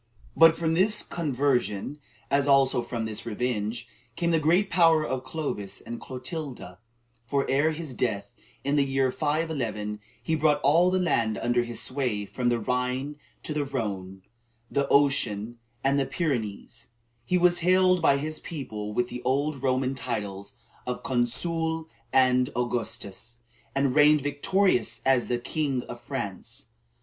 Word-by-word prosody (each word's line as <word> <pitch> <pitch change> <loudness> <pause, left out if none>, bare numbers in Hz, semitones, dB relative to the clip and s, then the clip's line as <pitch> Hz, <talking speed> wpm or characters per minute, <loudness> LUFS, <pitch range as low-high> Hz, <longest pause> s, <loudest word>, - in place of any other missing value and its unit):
But 165 0 +7
from 160 -1 0
this 210 +5 +3
conversion, 140 - -1 0.3
as 140 0 +3
also 135 -3 +4
from 120 -1 -4
this 110 -1 -5
revenge, 115 0 -2 0.3
came 170 0 0
the 165 - +3
great 175 +6 +2
power 165 -3 +5
of 130 -2 -3
Clovis 130 -10 -4
and 120 - -8
Clotilda; 130 - -6 0.5
for, 140 +2 0
ere 145 +4 +3
his 160 -3 -5
death, 110 -4 -2 0.3
in 140 +2 +1
the 140 - +5
year 135 -1 +1
511, 130 -10 -2 0.2
he 160 - -1
brought 155 -1 +3
all 165 +6 +5
the 185 - +1
land 115 -12 +1
under 120 +1 +1
his 120 -1 -5
sway 125 -6 -1
from 120 +4 -1
the 120 - +2
Rhine 125 +4 -1 0.3
to 155 - -4
the 150 -1 0
Rhone, 100 -8 -4 0.5
the 140 -1 +1
ocean 120 -6 +2 0.2
and 140 +1 +3
the 135 - 0
Pyrenees; 120 - -3 0.4
he 180 +10 +1
was 175 0 +4
hailed 185 +1 +4
by 140 -3 +4
his 155 +2 -3
people 110 -11 -6
with 120 +2 0
the 125 0 -6
old 140 +2 0
Roman 130 0 +1
titles 105 -5 -5 0.3
of 125 - -3
Consul 160 +6 -1 0.2
and 125 -1 +4
Augustus, 120 -1 -3 0.3
and 135 -1 +2
reigned 150 +1 +6
victorious 145 - +1
as 130 -2 +3
the 120 - +1
first 120 - -13
king 140 -5 -1
of 120 - -9
France. 120 -7 -5
135 Hz, 150 wpm, -27 LUFS, 120-155 Hz, 0.5 s, But